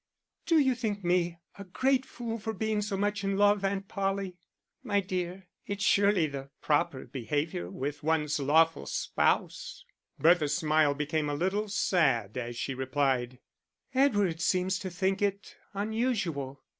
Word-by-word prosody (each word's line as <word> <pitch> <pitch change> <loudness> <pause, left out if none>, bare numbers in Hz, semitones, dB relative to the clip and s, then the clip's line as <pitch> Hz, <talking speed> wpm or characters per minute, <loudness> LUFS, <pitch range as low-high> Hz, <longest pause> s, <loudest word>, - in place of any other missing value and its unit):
"Do 330 - +4
you 265 -4 +4
think 215 -5 -3
me 175 -1 +1 0.2
a - - -5
great 260 +7 +1
fool 230 -1 -5
for 220 +1 -4
being 215 +1 -1
so 205 -1 -2
much 205 0 -1
in 195 0 0
love, 205 0 +4
Aunt 195 0 -1
Polly?" 195 -2 -2 0.5
"My 205 -1 +1
dear, 185 0 -4 0.2
it's 200 0 -3
surely 200 -4 +4
the 140 -2 -6
proper 145 -3 0
behaviour 140 - -3
with 145 +6 -4
one's 150 -1 0
lawful 160 +4 +3
spouse." - - -1 0.3
Bertha's 155 -3 +4
smile 155 -3 +3
became 150 +1 -1
a 145 - -1
little 190 +7 0
sad 135 - +1
as 120 -1 -4
she 135 - -2
replied 130 -1 0 0.6
"Edward 205 -11 +2
seems 185 +1 +1
to 190 - -4
think 190 +2 -1
it 200 0 -2 0.2
unusual." 195 - -2
185 Hz, 145 wpm, -29 LUFS, 150-205 Hz, 0.6 s, Do